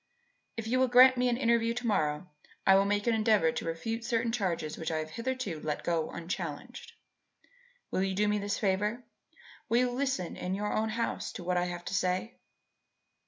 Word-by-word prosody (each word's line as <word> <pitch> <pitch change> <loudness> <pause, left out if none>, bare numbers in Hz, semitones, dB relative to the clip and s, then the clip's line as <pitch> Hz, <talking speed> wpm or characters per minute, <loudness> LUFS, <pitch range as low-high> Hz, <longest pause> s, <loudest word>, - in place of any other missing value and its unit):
If 225 - -4
you 250 +3 +1
will 260 - +4
grant 255 +1 +7
me 250 0 +2
an 240 - +1
interview 235 -2 +2
to 245 0 -4
morrow, 155 -6 0 0.4
I 195 - +7
will 195 +1 +5
make 205 0 0
an 235 - +3
endeavour 215 -7 +3
to - - -5
refute 225 +8 -3
certain 230 -1 0
charges 175 -9 -2
which 160 - -4
I 160 - -1
have 155 0 -4
hitherto 230 -6 -3
let 150 -1 -3
go 165 -2 0
unchallenged. 175 - -6 1.0
Will - - 0
you 190 0 0
do 210 +2 +2
me 210 0 +1
this 205 0 -2
favour? 210 +5 0 0.7
Will 235 - +3
you 250 0 +2
listen 260 -8 -2
in 185 +1 -3
your 210 +1 -2
own 220 +1 0
house 230 +2 -2
to 180 - -7
what 180 +1 0
I 175 - +1
have 175 -1 -5
to - - -5
say?" 185 +4 -1
210 Hz, 200 wpm, -30 LUFS, 175-235 Hz, 1.0 s, grant